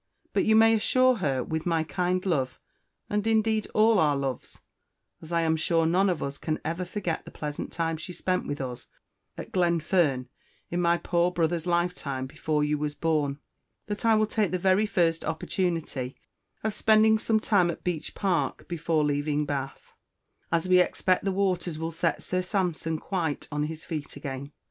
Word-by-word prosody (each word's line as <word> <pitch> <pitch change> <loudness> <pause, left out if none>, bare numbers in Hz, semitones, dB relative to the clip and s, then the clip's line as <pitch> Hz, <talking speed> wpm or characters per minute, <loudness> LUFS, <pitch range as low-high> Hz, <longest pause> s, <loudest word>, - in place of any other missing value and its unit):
But - - +2
you 220 - +4
may 225 0 +6
Assure 255 +3 +3
her, 135 - 0
with 160 +4 -3
my 165 -2 +2
Kind 180 +3 -1
love, 135 -9 0 0.5
and 210 +1 -1
indeed 220 -1 +2
all 220 -1 +5
our 150 -4 +3
Loves 135 -2 -4 0.6
(as 160 - -11
I 170 -1 +2
am 160 -1 +2
sure 165 +1 +2
None 185 +4 +3
of 175 -4 -1
us 140 0 -5
can 155 -1 -2
ever 170 +3 -2
forget 180 -3 -3
the - - -10
Pleasant 150 -1 -5
time 165 -1 -1
she 165 +3 -7
spent 185 +1 -1
with 145 - -3
us 125 -2 -6 0.5
at - - -7
Glenfern 170 -6 +1 0.4
in 175 +1 0
my 170 0 +3
Poor 175 0 +1
brother's 170 -1 -1
lifetime, 170 -7 -1
before 150 +3 -1
you 150 0 0
was 150 0 -2
Born), 150 -4 0 0.5
that 205 +1 -4
I 225 -1 +5
will 215 0 +3
Take 210 -2 0
the 185 - 0
very 190 +3 +3
first 170 -5 +1
Opportunity 160 -5 -2 0.5
of 220 0 0
Spending 220 +1 +4
some 220 0 +2
time 200 -5 +3
at 170 - -5
Beech 175 -4 -3
Park 175 -9 -1
before 165 -2 0
leaving 145 +1 0
Bath, 135 -1 -5 0.6
as 170 +1 +1
we 185 0 +6
Expect 185 +1 +2
the 195 - +2
Waters 185 -4 0
will 165 +1 -3
set 165 0 -1
Sir 185 0 -1
Sampson 180 -4 -1
quite 165 -3 -3
on 150 0 0
his 160 +1 -7
Feet 150 -3 -5
again. 140 0 -6
170 Hz, 180 wpm, -27 LUFS, 150-185 Hz, 0.6 s, may